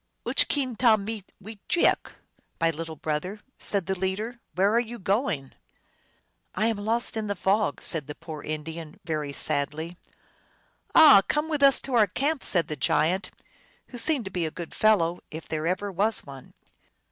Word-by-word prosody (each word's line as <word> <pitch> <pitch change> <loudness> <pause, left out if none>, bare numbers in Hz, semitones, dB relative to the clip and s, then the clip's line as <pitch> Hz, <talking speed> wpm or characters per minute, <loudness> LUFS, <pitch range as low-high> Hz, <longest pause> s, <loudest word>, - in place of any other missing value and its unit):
" - - -49
Uch - - +4
keen, 260 -5 -1
tahmee 220 -3 +2 0.2
wejeaok 215 - 0
f - - -17
" - - -41
" - - -45
My 165 0 +3
little 160 0 -6
brother," 155 +7 -3 0.2
said 200 -4 +2
the 190 - -1
leader, 195 +6 -3
" - - -43
where 195 +3 +3
are 235 - +4
you 240 0 -4
going? 195 - -1 0.5
" - - -35
"I 210 - +1
am 225 -2 +1
lost 225 +4 -1
in 220 -1 -2
the 205 - -2
fog," 200 +3 0
said 155 -5 0
the 150 - -7
poor 160 -2 -8
Indian, 155 +1 -6
very 155 -3 -2
sadly. 155 +4 -1 1.0
"Ah, 300 -11 +9
come 300 +2 0
with 300 -3 -1
us 275 -1 +6
to 270 - -5
our 220 -3 +5
camp," 280 - -1
said 170 -4 +2
the 155 - -4
giant, 175 +7 +1 0.6
who 245 - -6
seemed 270 -2 0
to 190 - -6
be 175 -3 -1
a - - -3
good 170 +1 -8
fellow, 180 -6 +3
if 160 +1 -8
there 155 0 -2
ever 190 +3 -1
was 205 +4 0
one. 135 -2 -12
190 Hz, 190 wpm, -26 LUFS, 160-225 Hz, 1.0 s, Ah